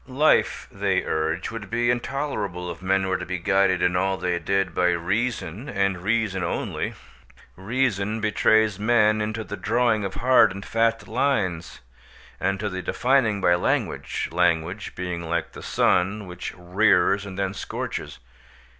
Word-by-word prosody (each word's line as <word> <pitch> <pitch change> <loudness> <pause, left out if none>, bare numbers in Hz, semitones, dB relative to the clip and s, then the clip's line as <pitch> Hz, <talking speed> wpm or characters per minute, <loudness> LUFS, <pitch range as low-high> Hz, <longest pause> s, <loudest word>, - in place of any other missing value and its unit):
Life, 140 +4 +2
they - - 0
urge, 80 +3 -2
would 110 -4 -7
be 120 +1 +1
intolerable 120 -9 -3
if 85 - -10
men 95 +1 +1
were 95 0 0
to 90 - -5
be 90 +1 -2
guided 95 0 +2
in 90 0 +2
all 95 +1 +1
they 90 -1 -1
did 95 +1 0
by 90 +1 +2
reason 105 - -2
and 100 -2 0
reason 105 -2 0
only. 85 - -3 0.6
Reason 110 0 -1
betrays 110 -1 +2
men 110 -1 +3
into 110 +1 -3
the 100 0 -6
drawing 115 -1 +1
of 95 -1 -4
hard 130 -2 +5
and 100 - -8
fast 115 0 0
lines, 105 -9 -1 0.6
and 95 0 0
to 105 - -2
the 95 -2 -4
defining 120 -3 +1
by 90 - +4
language—language 90 +1 -1
being 90 -2 -4
like 85 0 -1
the - - -10
sun, 100 +4 +1
which 90 0 -6
rears 95 +1 +2
and 100 -2 -8
then 100 -1 -1
scorches. - - -5
100 Hz, 150 wpm, -24 LUFS, 90-110 Hz, 0.6 s, hard